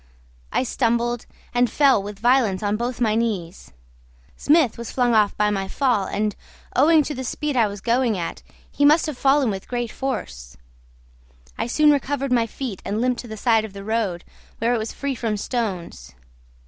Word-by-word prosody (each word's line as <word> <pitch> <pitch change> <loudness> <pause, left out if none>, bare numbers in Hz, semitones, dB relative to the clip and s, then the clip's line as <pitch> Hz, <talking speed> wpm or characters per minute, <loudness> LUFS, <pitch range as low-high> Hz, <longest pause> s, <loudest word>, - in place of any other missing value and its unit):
I - - +1
stumbled, 240 -1 0 0.3
and 245 0 +3
fell 275 -7 +4
with 205 0 -7
violence 230 -3 +2
on 205 0 +1
both 240 +3 -3
my 220 -3 +2
knees. 205 - -3 0.6
Smith 295 -5 +3
was 235 0 -7
flung 245 -2 +1
off 210 -2 +3
by 210 0 +2
my 195 -1 -2
fall, 240 -3 +1
and, 210 +1 -2 0.4
owing 310 +3 +5
to 295 - -4
the 260 -1 -5
speed 295 +3 -3
I 230 -3 +4
was 200 -1 -7
going 235 -2 +1
at, 170 - -5 0.3
he 285 - -1
must 305 +3 +5
have 305 - -4
fallen 270 -2 +3
with 195 -1 -6
great 240 -2 -3
force. 65 - -5 1.0
I - - -2
soon 300 +5 +4
recovered 280 -1 -1
my 235 -2 +3
feet 230 -4 -6
and 210 +2 -2
limped 250 0 0
to 245 - -11
the 220 -1 -7
side 225 0 +3
of 215 -3 -8
the 200 0 -8
road, 205 -5 -1 0.3
where 230 +2 +1
it 240 - +1
was 220 +1 -4
free 280 -1 -3
from 225 -4 -2
stones. 195 - -4
235 Hz, 185 wpm, -22 LUFS, 210-260 Hz, 1.0 s, owing